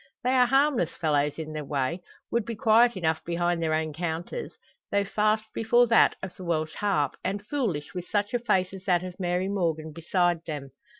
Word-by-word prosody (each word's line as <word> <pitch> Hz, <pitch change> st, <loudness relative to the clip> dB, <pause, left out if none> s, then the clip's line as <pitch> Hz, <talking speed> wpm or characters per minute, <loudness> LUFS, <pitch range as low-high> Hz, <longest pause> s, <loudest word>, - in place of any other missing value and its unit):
They 250 Hz, -, +2 dB
are 250 Hz, -1 st, +5 dB
harmless 270 Hz, -, +3 dB
fellows 150 Hz, -2 st, +1 dB
in 155 Hz, -1 st, -6 dB
their 155 Hz, -1 st, -4 dB
way; 140 Hz, +4 st, -2 dB, 0.3 s
would 235 Hz, -1 st, +1 dB
be 230 Hz, +2 st, -5 dB
quiet 225 Hz, +1 st, +4 dB
enough 160 Hz, -3 st, 0 dB
behind 175 Hz, 0 st, 0 dB
their 160 Hz, -1 st, +1 dB
own 155 Hz, -1 st, -2 dB
counters; 170 Hz, -, -4 dB, 0.4 s
though 200 Hz, 0 st, +2 dB
fast 215 Hz, +2 st, +1 dB
before 240 Hz, +2 st, +4 dB
that 230 Hz, -, +5 dB
of 190 Hz, -, -6 dB
the 185 Hz, -, -10 dB
"Welsh 155 Hz, -3 st, -1 dB
Harp," 170 Hz, -10 st, 0 dB
and 200 Hz, +1 st, -3 dB
foolish 210 Hz, -, -2 dB
with 180 Hz, -1 st, -5 dB
such 205 Hz, 0 st, 0 dB
a 245 Hz, -, +2 dB
face 190 Hz, -5 st, +1 dB
as 190 Hz, -1 st, -9 dB
that 180 Hz, -3 st, +2 dB
of 180 Hz, 0 st, -8 dB
Mary 180 Hz, 0 st, 0 dB
Morgan 165 Hz, -5 st, -1 dB
beside 175 Hz, +1 st, 0 dB
them. 145 Hz, -4 st, -5 dB
180 Hz, 195 wpm, -27 LUFS, 160-215 Hz, 0.4 s, are